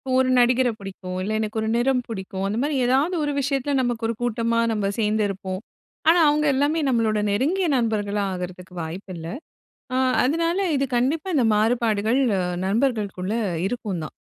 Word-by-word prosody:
ஒரு 260 0 +3
நடிகரை 245 0 +4
புடிக்கும். 190 -2 -7
இல்ல, 210 - -2
எனக்கு 220 0 -2
ஒரு 220 - -2
நிறம் 250 +1 +2
புடிக்கும். 190 -3 -4
அந்தமாரி 260 +9 -1
ஏதாவது 280 +8 +2
ஒரு 290 -1 -1
விஷயத்துல, 275 +1 -1
நமக்கு 240 -2 -1
ஒரு 230 - -2
கூட்டமா 230 -1 0
நம்ப 205 -2 0
சேர்ந்திருப்போம். 205 -3 -1 0.5
ஆனா, 345 +1 +6
அவுங்க 300 0 +2
எல்லாமே 295 +4 +1
நம்பளோட 225 -4 +1
நெருங்கிய 330 - +1
நண்பர்களா 210 -3 0
ஆகுறதுக்கு 180 0 -7
வாய்ப்பு 185 +4 -7
இல்ல. 165 0 -7 0.7
அ - - +1 0.3
அதனால, 335 +6 +1 0.2
இது 275 0 +1
கண்டிப்பா 300 +9 0
இந்த 245 -4 +3
மாறுபாடுகள் 225 +1 +2 0.2
அ - - 0 0.2
நண்பர்கள்க்குள்ள 210 -3 0 0.3
இருக்கும் 205 -7 -3
தான். - - -8
230 Hz, 150 wpm, -23 LUFS, 200-265 Hz, 0.7 s, ஆனா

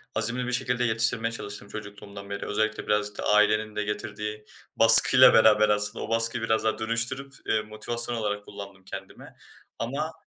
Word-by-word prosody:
azimli 115 +3 -2
bir - - -4
şekilde 125 -1 -1
yetiştirmeye 115 0 0
çalıştım 105 -3 -8
çocukluğumdan 100 -1 -11
beri. 100 0 -6
Özellikle 110 +1 -3
biraz 105 0 -2
da - - -6
ailenin 105 +1 +1
de 105 - -2
getirdiği 105 +1 -6 0.3
baskıyla 115 +3 +8
beraber 105 -1 +4
aslında, 105 +1 -1
o - - -12
baskıyı 115 +1 0
biraz 110 0 -1
daha 110 0 -2
dönüştürüp, 120 +5 -1
eee, 110 - 0
motivasyon 120 +3 -3
olarak 105 -2 -4
kullandım 100 -1 -12
kendime 95 0 -12 0.4
ama 145 +7 -4
110 Hz, 160 wpm, -25 LUFS, 105-115 Hz, 0.4 s, baskıyla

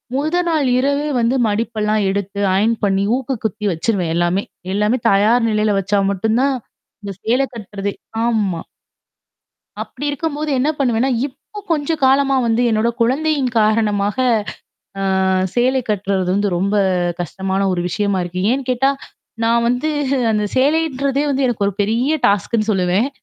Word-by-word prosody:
முதல் 310 +5 0
நாள் 310 -5 +1
இரவே 280 +3 0
வந்து 235 +2 +1
மடிப்பெல்லாம் 215 0 0
எடுத்து 200 +1 -3 0.2
அயர்ன் 220 +4 +2
பண்ணி 195 0 +1
ஊக்கு 265 0 -3
குத்தி 210 0 -2
வச்சுருவேன் 175 0 -1
எல்லாமே! 175 +3 +1 0.3
எல்லாமே 210 +5 +1
தயார் 225 +4 +3
நிலையில 215 -1 +1
வச்சா 200 +1 0
மட்டும் 220 +4 0
தான் 275 0 +2 0.5
இந்த 200 - -5
சேல 245 +4 +2
கட்டுறது 200 -2 -5 0.3
ஆமா. 205 -8 0 1.2
அப்பிடி 275 +3 -7
இருக்கும்போது 300 +1 -3
என்ன 285 +4 +1
பண்ணுவேன்னா, 250 -1 +1 0.2
இப்போ 355 +9 -12
கொஞ்சம் 315 0 0
காலமா 270 +1 +3
வந்து 230 +1 +1
என்னோட 220 +1 +1
குழந்தையின் 275 +1 +1
காரணமாக 210 0 +1 0.8
ஆ - - -2 0.5
சேலை 255 +2 +2
கட்டுறது 195 -3 -1
வந்து 205 +1 +1
ரொம்ப 200 +3 0 0.4
கஷ்டமான 190 +3 -2
ஒரு 180 - -1
விஷயமா 200 +1 -1
இருக்கு. 175 +1 -4
ஏன்னு 270 +1 -2
கேட்டா, 260 +2 +2 0.5
நான் 235 +1 +2
வந்து 250 +5 0 0.4
அந்த 210 -1 0
சேலைன்றதே 280 -1 +1
வந்து 275 0 0
எனக்கு 225 -5 0
ஒரு 200 - -4
பெரிய 240 +9 +1
டாஸ்க்ன்னு 215 +2 +1
சொல்லுவேன். 190 +5 +1
225 Hz, 140 wpm, -18 LUFS, 200-265 Hz, 1.2 s, தயார்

